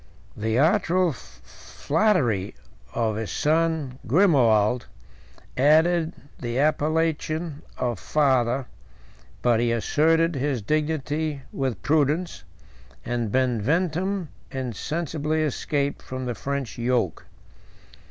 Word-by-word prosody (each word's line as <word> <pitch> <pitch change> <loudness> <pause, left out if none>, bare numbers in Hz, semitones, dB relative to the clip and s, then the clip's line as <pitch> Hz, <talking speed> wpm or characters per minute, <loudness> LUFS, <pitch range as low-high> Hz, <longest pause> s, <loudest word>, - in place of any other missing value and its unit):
The 110 +2 -1
artful 180 +3 +3
flattery 135 - -1 0.4
of 110 -3 0
his 110 -2 -3
son 155 -4 0
Grimoald 125 - +3 0.7
added 160 +4 +3 0.3
the 120 -1 -3
appellation 155 +1 0 0.2
of 120 -5 -2
father, 130 -3 +1 0.8
but 120 -2 +3
he 120 0 +1
asserted 160 +8 +2
his 135 -4 -1
dignity 150 +1 -1
with 125 -10 -3
prudence, 155 - +1 0.6
and 120 -3 -2
Benventum 160 - 0 0.2
insensibly 150 +5 -2
escaped 145 -1 -1
from 130 0 -6
the 120 - -2
French 140 -1 -4
yoke. 120 -7 0
140 Hz, 90 wpm, -25 LUFS, 120-160 Hz, 0.8 s, artful